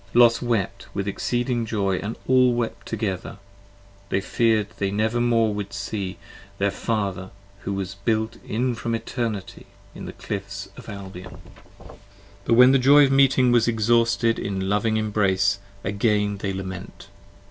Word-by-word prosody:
Los 120 Hz, -1 st, +6 dB
wept 100 Hz, -5 st, -2 dB
with 100 Hz, 0 st, -2 dB
exceeding 120 Hz, +4 st, -1 dB
joy 100 Hz, -4 st, -1 dB
& -, -, -13 dB
all 125 Hz, -1 st, +4 dB
wept 120 Hz, -1 st, -1 dB
with -, -, -26 dB
joy -, -, -10 dB, 0.2 s
together: 95 Hz, +3 st, -5 dB, 0.7 s
They -, -, +1 dB
fear'd 110 Hz, +1 st, +1 dB
they 100 Hz, -, 0 dB
never 110 Hz, +4 st, 0 dB
more 115 Hz, -3 st, +2 dB
should 105 Hz, -1 st, -5 dB
see 95 Hz, -3 st, -4 dB, 0.4 s
their 100 Hz, 0 st, +1 dB
Father, 100 Hz, -3 st, -2 dB, 0.3 s
who -, -, -21 dB
15 -, -, -2 dB
Was 95 Hz, -2 st, -4 dB
built 110 Hz, +1 st, 0 dB
in 125 Hz, +3 st, -1 dB
from 115 Hz, 0 st, -2 dB
Eternity, 115 Hz, -4 st, -4 dB, 0.3 s
in -, -, -8 dB
the -, -, -7 dB
Cliffs 100 Hz, -1 st, -6 dB
of 125 Hz, -2 st, -11 dB
Albion. 95 Hz, -2 st, -8 dB
9 -, -, -13 dB, 0.5 s
c -, -, -14 dB, 0.5 s
But -, -, +2 dB
when 125 Hz, +2 st, +8 dB
the 135 Hz, -, +4 dB
joy 140 Hz, +3 st, +7 dB
of 135 Hz, -, 0 dB
meeting 135 Hz, -2 st, +4 dB
was 120 Hz, -1 st, +4 dB
exhausted 115 Hz, 0 st, +2 dB
in 95 Hz, -1 st, -3 dB
loving 105 Hz, +2 st, +1 dB
embrace, 100 Hz, -2 st, +1 dB, 0.2 s
Again 105 Hz, 0 st, 0 dB
they 100 Hz, 0 st, -2 dB
lament. 95 Hz, +1 st, -7 dB
110 Hz, 165 wpm, -24 LUFS, 100-120 Hz, 0.7 s, when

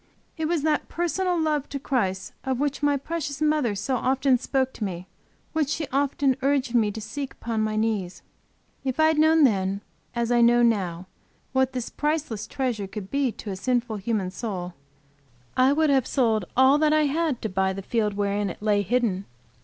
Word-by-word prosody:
It 320 Hz, -, -2 dB
was 330 Hz, -3 st, 0 dB
that 305 Hz, -1 st, 0 dB
personal 350 Hz, +1 st, 0 dB
love 300 Hz, -3 st, 0 dB
to 280 Hz, -, -3 dB
Christ 195 Hz, -9 st, -1 dB
of 260 Hz, -2 st, -1 dB
which 290 Hz, 0 st, -1 dB
my 290 Hz, -1 st, +3 dB
precious 295 Hz, -1 st, -4 dB
mother 300 Hz, -8 st, +1 dB
so 250 Hz, +7 st, -1 dB
often 260 Hz, 0 st, +2 dB
spoke 265 Hz, 0 st, 0 dB
to -, -, -5 dB
me 180 Hz, -3 st, -4 dB, 0.5 s
which 310 Hz, -3 st, +1 dB
she 315 Hz, 0 st, -1 dB
often 275 Hz, 0 st, +1 dB
urged 270 Hz, -2 st, +1 dB
me 225 Hz, -3 st, +3 dB
to 215 Hz, +2 st, -5 dB
seek 260 Hz, +6 st, -5 dB
upon 225 Hz, -2 st, -3 dB
my 215 Hz, 0 st, -1 dB
knees. 215 Hz, -5 st, -1 dB, 0.6 s
If 265 Hz, +1 st, -2 dB
I 315 Hz, 0 st, +6 dB
had 315 Hz, -1 st, +1 dB
known 315 Hz, 0 st, +5 dB
then, 195 Hz, -5 st, +2 dB, 0.3 s
as 235 Hz, 0 st, 0 dB
I 240 Hz, 0 st, +4 dB
know 240 Hz, +1 st, +5 dB
now 190 Hz, -6 st, +1 dB, 0.5 s
what 265 Hz, 0 st, +2 dB
this 250 Hz, -2 st, -4 dB
priceless 300 Hz, -8 st, -2 dB
treasure 240 Hz, -7 st, -2 dB
could 195 Hz, -1 st, -8 dB
be 275 Hz, -3 st, +1 dB
to 205 Hz, -, -7 dB
a -, -, -3 dB
sinful 240 Hz, +1 st, -1 dB
human 200 Hz, -2 st, -2 dB
soul, 185 Hz, -4 st, -5 dB, 0.8 s
I 255 Hz, +1 st, +5 dB
would 305 Hz, 0 st, +3 dB
have 265 Hz, -3 st, +2 dB
sold 225 Hz, -7 st, +1 dB
all 265 Hz, +3 st, +6 dB
that 305 Hz, 0 st, +3 dB
I 310 Hz, 0 st, +4 dB
had 295 Hz, -2 st, 0 dB
to 220 Hz, -, -1 dB
buy 190 Hz, 0 st, +1 dB
the 195 Hz, +1 st, -6 dB
field 210 Hz, -1 st, 0 dB
wherein 200 Hz, 0 st, 0 dB
it -, -, -8 dB
lay 205 Hz, -1 st, +3 dB
hidden. 205 Hz, -2 st, 0 dB
250 Hz, 190 wpm, -25 LUFS, 210-285 Hz, 0.8 s, I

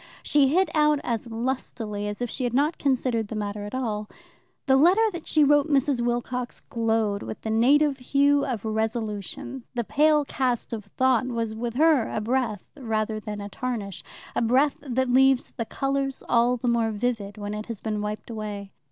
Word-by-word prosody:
She 290 Hz, -2 st, +4 dB
hit 345 Hz, +4 st, +2 dB
out 300 Hz, -2 st, +3 dB
as 235 Hz, 0 st, -3 dB
lustily 225 Hz, -3 st, -3 dB
as 205 Hz, +4 st, -4 dB
if 245 Hz, -, -2 dB
she 260 Hz, -, -3 dB
had 245 Hz, -1 st, -1 dB
not 295 Hz, +4 st, +1 dB
considered 250 Hz, -5 st, 0 dB
the 220 Hz, -, -6 dB
matter 205 Hz, -1 st, -3 dB
at 205 Hz, -, -6 dB
all. 215 Hz, -5 st, -2 dB, 0.6 s
The 265 Hz, -, +4 dB
letter 360 Hz, +11 st, +5 dB
that 345 Hz, -3 st, -8 dB
she 310 Hz, -, +4 dB
wrote 290 Hz, 0 st, +4 dB
Mrs. 275 Hz, -3 st, +2 dB
Wilcox 240 Hz, +1 st, -2 dB
glowed 225 Hz, -3 st, 0 dB
with -, -, -6 dB
the 220 Hz, -, -3 dB
native 275 Hz, +5 st, +4 dB
hue 280 Hz, +2 st, +3 dB
of 230 Hz, -5 st, -3 dB
resolution. 220 Hz, +2 st, -3 dB
The 240 Hz, -, 0 dB
pale 300 Hz, +4 st, +3 dB
cast 250 Hz, -4 st, -1 dB
of 215 Hz, -3 st, -5 dB
thought 260 Hz, -1 st, +3 dB
was 230 Hz, -3 st, -2 dB
with 235 Hz, +1 st, -4 dB
her 300 Hz, -4 st, +4 dB
a -, -, -1 dB
breath 225 Hz, -2 st, -1 dB
rather 220 Hz, -5 st, -2 dB
than 210 Hz, -1 st, -6 dB
a 200 Hz, -, -6 dB
tarnish, 215 Hz, -4 st, -4 dB, 0.3 s
a -, -, +1 dB
breath 260 Hz, +5 st, +3 dB
that 260 Hz, -2 st, -1 dB
leaves 265 Hz, 0 st, +4 dB
the 230 Hz, -, -2 dB
colours 275 Hz, +2 st, -2 dB
all 240 Hz, +1 st, +3 dB
the 245 Hz, -, -3 dB
more 235 Hz, -1 st, +2 dB
vivid 215 Hz, -2 st, -2 dB
when 205 Hz, 0 st, -5 dB
it 210 Hz, 0 st, -5 dB
has 230 Hz, -4 st, -5 dB
been 215 Hz, -2 st, -3 dB
wiped 210 Hz, +2 st, -5 dB
away. 205 Hz, -3 st, -6 dB
240 Hz, 185 wpm, -25 LUFS, 215-270 Hz, 0.6 s, letter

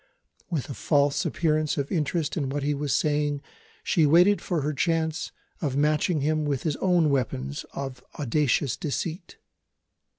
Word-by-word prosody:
With 160 Hz, -7 st, -2 dB
a 140 Hz, -, -5 dB
false 140 Hz, +3 st, +2 dB
appearance 155 Hz, -2 st, 0 dB
of 140 Hz, -1 st, -2 dB
interest 155 Hz, -1 st, -1 dB
in 140 Hz, -6 st, -1 dB
what 140 Hz, +1 st, -2 dB
he 145 Hz, +1 st, +1 dB
was 145 Hz, 0 st, -2 dB
saying 145 Hz, 0 st, +1 dB, 0.4 s
she 160 Hz, -3 st, +3 dB
waited 180 Hz, +7 st, +5 dB
for 170 Hz, -4 st, -1 dB
her 150 Hz, +2 st, -1 dB
chance 160 Hz, +1 st, 0 dB, 0.3 s
of 140 Hz, -5 st, -1 dB
matching 150 Hz, +2 st, +2 dB
him 155 Hz, +2 st, +1 dB
with 140 Hz, -3 st, -1 dB
his 155 Hz, -3 st, 0 dB
own 175 Hz, -5 st, +3 dB
weapons 70 Hz, -, -2 dB
of 135 Hz, -2 st, -6 dB
audacious 145 Hz, -1 st, +1 dB
deceit. 165 Hz, +4 st, -4 dB
150 Hz, 155 wpm, -26 LUFS, 140-160 Hz, 0.4 s, waited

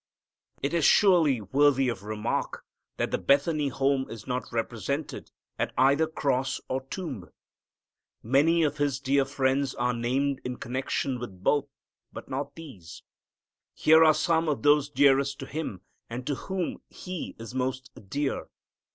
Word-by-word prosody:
It 140 Hz, -, -1 dB
is 170 Hz, -2 st, +1 dB
surely 165 Hz, -, +5 dB
worthy 135 Hz, +4 st, +3 dB
of 115 Hz, -6 st, -2 dB
remark 105 Hz, +1 st, -3 dB, 0.3 s
that -, -, -1 dB
the -, -, 0 dB
Bethany 145 Hz, +1 st, +2 dB
home 135 Hz, 0 st, 0 dB
is 115 Hz, -2 st, -9 dB
not 125 Hz, 0 st, -2 dB
represented 120 Hz, +5 st, -3 dB, 0.3 s
at -, -, -1 dB
either 140 Hz, +5 st, +4 dB
cross 135 Hz, -4 st, -1 dB
or 130 Hz, +1 st, -2 dB
tomb. 135 Hz, -, -6 dB, 0.9 s
Many 150 Hz, +8 st, +3 dB
of 150 Hz, -1 st, 0 dB
His 145 Hz, -3 st, 0 dB
dear 140 Hz, 0 st, +2 dB
friends 135 Hz, 0 st, 0 dB
are 125 Hz, 0 st, 0 dB
named 130 Hz, +4 st, -1 dB
in 125 Hz, 0 st, -4 dB
connection 130 Hz, +1 st, -2 dB
with 95 Hz, -6 st, -9 dB
both, 145 Hz, +4 st, +2 dB, 0.4 s
but -, -, -9 dB
not 140 Hz, +1 st, -4 dB
these. 130 Hz, -, -11 dB, 0.7 s
Here 160 Hz, +1 st, +6 dB
are 155 Hz, -1 st, +6 dB
some 165 Hz, -2 st, +1 dB
of 145 Hz, -, -2 dB
those 145 Hz, -1 st, +4 dB
dearest 140 Hz, -1 st, +3 dB
to -, -, -5 dB
Him, 135 Hz, -, -5 dB, 0.3 s
and 120 Hz, +2 st, -6 dB
to 145 Hz, -, -1 dB
whom 185 Hz, +5 st, -4 dB
He 185 Hz, -2 st, -7 dB
is 115 Hz, +2 st, -9 dB
most 130 Hz, 0 st, -3 dB, 0.2 s
dear. 140 Hz, +4 st, -2 dB
135 Hz, 150 wpm, -27 LUFS, 125-145 Hz, 0.9 s, Here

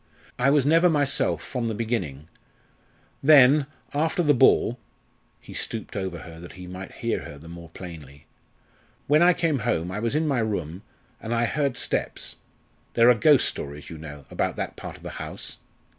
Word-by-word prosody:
I 125 Hz, +2 st, +4 dB
was 140 Hz, -2 st, +3 dB
never 165 Hz, +4 st, +5 dB
myself 145 Hz, -3 st, +1 dB
from 125 Hz, -3 st, -3 dB
the 110 Hz, -, -2 dB
beginning. 90 Hz, -, -3 dB, 0.9 s
Then, 140 Hz, 0 st, +7 dB, 0.3 s
after 160 Hz, +5 st, +1 dB
the 150 Hz, -2 st, +5 dB
ball," 125 Hz, -2 st, +4 dB, 0.6 s
he -, -, -12 dB
stooped 110 Hz, -, -3 dB
over 95 Hz, -3 st, -3 dB
her 80 Hz, -2 st, -11 dB
that 85 Hz, +1 st, -10 dB
he 90 Hz, -, -10 dB
might 90 Hz, +1 st, -8 dB
hear -, -, -2 dB
her 70 Hz, -, -9 dB
the 80 Hz, +3 st, -13 dB
more 85 Hz, 0 st, -10 dB
plainly, 80 Hz, -6 st, -11 dB, 0.8 s
"when 150 Hz, +3 st, +4 dB
I 180 Hz, +1 st, +7 dB
came 165 Hz, -5 st, 0 dB
home 90 Hz, -7 st, -1 dB
I 100 Hz, -, -3 dB
was 115 Hz, +4 st, -1 dB
in 155 Hz, +1 st, +1 dB
my 135 Hz, -4 st, +1 dB
room 95 Hz, -6 st, -2 dB, 0.4 s
and 115 Hz, +1 st, -2 dB
I 115 Hz, 0 st, +2 dB
heard 140 Hz, +2 st, -1 dB
steps -, -, -2 dB, 0.6 s
there 120 Hz, +1 st, +7 dB
are -, -, +7 dB
ghost 145 Hz, +3 st, +5 dB
stories, 75 Hz, +2 st, -6 dB
you 80 Hz, -, -8 dB
know, 75 Hz, -3 st, -9 dB
about -, -, -1 dB
that -, -, -4 dB
part -, -, -8 dB
of -, -, -19 dB
the -, -, -6 dB
house. -, -, -7 dB
115 Hz, 180 wpm, -25 LUFS, 85-145 Hz, 0.9 s, Then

